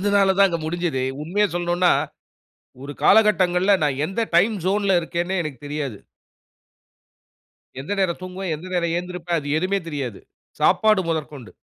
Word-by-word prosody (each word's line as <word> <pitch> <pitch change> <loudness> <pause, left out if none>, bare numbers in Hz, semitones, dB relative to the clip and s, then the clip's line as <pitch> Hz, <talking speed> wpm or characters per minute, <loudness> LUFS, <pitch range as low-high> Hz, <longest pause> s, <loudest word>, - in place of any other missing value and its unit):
அதுனால 200 -1 +3
தான் 200 -1 +6
அங்க 170 -1 -2
முடிஞ்சிது. 165 -4 -2 0.2
உண்மைய 200 +7 +1
சொல்லணும்னா, 175 +1 +2 0.9
ஒரு 145 - -6
காலகட்டங்கள்ல 195 -3 +4
நான் 140 -2 -1
எந்த 195 +6 -3 0.2
டைம் 205 +6 +4
ஜோன்ல 195 0 +2
இருக்கேன்னே 175 +3 -2
எனக்குத் 145 -5 -8
தெரியாது. 145 -7 -4 1.8
எந்த 140 +8 -7
நேரம் 180 -3 0
தூங்குவேன், 185 -1 -4
எந்த 165 +5 -10
நேரம் 170 -1 0
எந்திரிப்பேன், 180 -1 -3
அது 145 -1 -7
எதுவுமே 195 +3 0
தெரியாது. 135 -9 -5 0.4
சாப்பாடு 215 -3 +3
முதற்கொண்டு. 150 -6 -4
175 Hz, 135 wpm, -22 LUFS, 155-190 Hz, 1.8 s, தான்